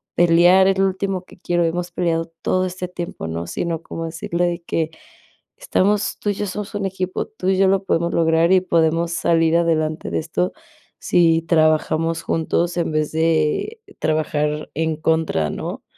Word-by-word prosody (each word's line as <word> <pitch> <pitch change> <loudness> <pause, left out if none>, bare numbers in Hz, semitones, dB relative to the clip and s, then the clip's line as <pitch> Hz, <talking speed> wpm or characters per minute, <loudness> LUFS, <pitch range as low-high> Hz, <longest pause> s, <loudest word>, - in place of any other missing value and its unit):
pelear, 175 +2 +5
es 195 - +2
lo 195 - +4
último 190 -1 -3
que - - -17
quiero, 175 -1 0
hemos 175 +1 -2
peleado 165 -2 -1
todo 185 0 +1
este 180 0 -5
tiempo", 175 - -6
¿no? 85 +1 -4
Sino 165 - -3
como 165 0 -6
decirle 170 +2 -2
de 170 0 -3
que: 165 -1 -2 0.7
"Estamos 210 - 0
tú 205 - -2
y - - -1
yo 205 - -3
somos 210 +2 -6
un 200 -1 -2
equipo, 185 -1 -3
tú 190 -4 -6
y 190 - +2
yo 195 0 +4
lo 195 0 +2
podemos 170 -1 0
lograr, 165 +1 +3
y 185 - +5
podemos 165 -1 +1
salir 165 -1 +2
adelante 155 - 0
de 85 - 0
esto 90 +3 -2 0.5
si 165 -2 +3
trabajamos 160 0 +2
juntos 170 +2 -1
en 170 -2 0
vez 155 -1 -1
de 160 - 0 0.2
trabajar 150 -1 -1
en 160 0 -1
contra, 160 - 0
¿no?, - - -6
170 Hz, 175 wpm, -21 LUFS, 160-185 Hz, 0.7 s, pelear